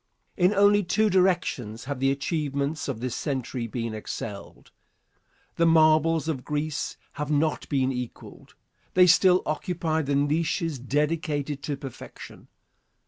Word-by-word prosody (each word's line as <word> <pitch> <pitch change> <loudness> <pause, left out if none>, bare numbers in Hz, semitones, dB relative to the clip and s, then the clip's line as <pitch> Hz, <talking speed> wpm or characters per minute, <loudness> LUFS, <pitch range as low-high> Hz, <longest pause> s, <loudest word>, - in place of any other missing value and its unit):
In 180 0 +3
only 205 +1 +5
two 215 +4 +1
directions 175 - +1
have 140 -1 -4
the 135 +1 +2
achievements 140 +1 -2
of 125 -5 -4
this 125 -2 -3
century 130 -4 -3
been 115 -1 -4
excelled. 105 -1 -7 0.9
The 170 - +4
marbles 160 -1 +4
of 140 -6 -2
Greece 150 0 -3
have 150 0 -5
not 150 +1 0
been 135 -2 +1
equalled. 125 -2 -8 0.4
They 180 0 +7
still 180 +1 +5
occupy 160 +1 -1
the 140 -1 -1
niches 155 +1 0
dedicated 145 +1 -1
to 145 -1 -3
perfection. 135 -3 -10
150 Hz, 130 wpm, -26 LUFS, 135-165 Hz, 0.9 s, They